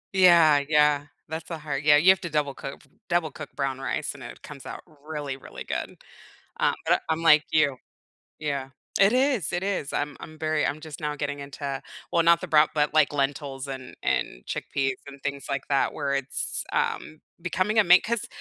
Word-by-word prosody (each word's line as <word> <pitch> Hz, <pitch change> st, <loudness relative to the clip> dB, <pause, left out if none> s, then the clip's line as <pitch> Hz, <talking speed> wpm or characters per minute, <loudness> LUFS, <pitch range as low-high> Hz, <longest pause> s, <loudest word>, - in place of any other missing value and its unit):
Yeah, 170 Hz, -6 st, +7 dB
yeah, 150 Hz, -1 st, +3 dB, 0.2 s
that's 160 Hz, +1 st, -6 dB
the 165 Hz, -, -4 dB
hard 150 Hz, -2 st, -4 dB
yeah, 150 Hz, -1 st, +7 dB
you 170 Hz, +5 st, +5 dB
have 190 Hz, -, +1 dB
to 170 Hz, -, -4 dB
double 150 Hz, -3 st, 0 dB
coo 135 Hz, -, -7 dB
f -, -, -23 dB, 0.2 s
double 170 Hz, -3 st, +1 dB
cook 155 Hz, 0 st, -8 dB
brown 135 Hz, -2 st, -2 dB
rice, 145 Hz, +2 st, -2 dB
and 140 Hz, -, -13 dB
it 120 Hz, -, -10 dB
comes 145 Hz, -3 st, -10 dB
out -, -, -7 dB, 0.3 s
really, 145 Hz, -4 st, -4 dB
really -, -, -9 dB
good. -, -, -4 dB, 0.6 s
Um, -, -, +2 dB
but -, -, +4 dB
a -, -, -15 dB
I'm 160 Hz, +1 st, -1 dB
like 155 Hz, -2 st, +6 dB
you 145 Hz, -4 st, +3 dB, 0.6 s
Yeah, 140 Hz, -3 st, -3 dB, 0.3 s
it 195 Hz, +3 st, +6 dB
is, 255 Hz, -, +2 dB
it 175 Hz, +1 st, -1 dB
is, 195 Hz, -7 st, -2 dB
I'm 145 Hz, 0 st, -2 dB
I'm 155 Hz, 0 st, -11 dB
very 155 Hz, -1 st, +1 dB
I'm 150 Hz, +2 st, -2 dB
just 155 Hz, -3 st, -9 dB
now 150 Hz, -1 st, -2 dB
getting 145 Hz, -1 st, -3 dB
into 140 Hz, -1 st, -5 dB, 0.3 s
well, 170 Hz, -1 st, +3 dB
not 170 Hz, 0 st, +5 dB
the -, -, -6 dB
brow 150 Hz, 0 st, +6 dB
but, 150 Hz, -1 st, +1 dB
like, 155 Hz, -2 st, +4 dB
lentils 140 Hz, -1 st, -2 dB
and 130 Hz, -1 st, -7 dB
and -, -, -1 dB
chickpeas 135 Hz, -1 st, -1 dB
and 140 Hz, -1 st, -11 dB
things 140 Hz, -1 st, -3 dB
like 140 Hz, -1 st, -3 dB
that 140 Hz, -1 st, +2 dB
where 140 Hz, -2 st, -1 dB
it's, 135 Hz, 0 st, -2 dB
um, 155 Hz, 0 st, -2 dB, 0.2 s
becoming 185 Hz, +5 st, 0 dB
a 215 Hz, -, +6 dB
main 180 Hz, +1 st, +7 dB
'cause 235 Hz, -1 st, -2 dB
150 Hz, 205 wpm, -26 LUFS, 140-160 Hz, 0.6 s, Yeah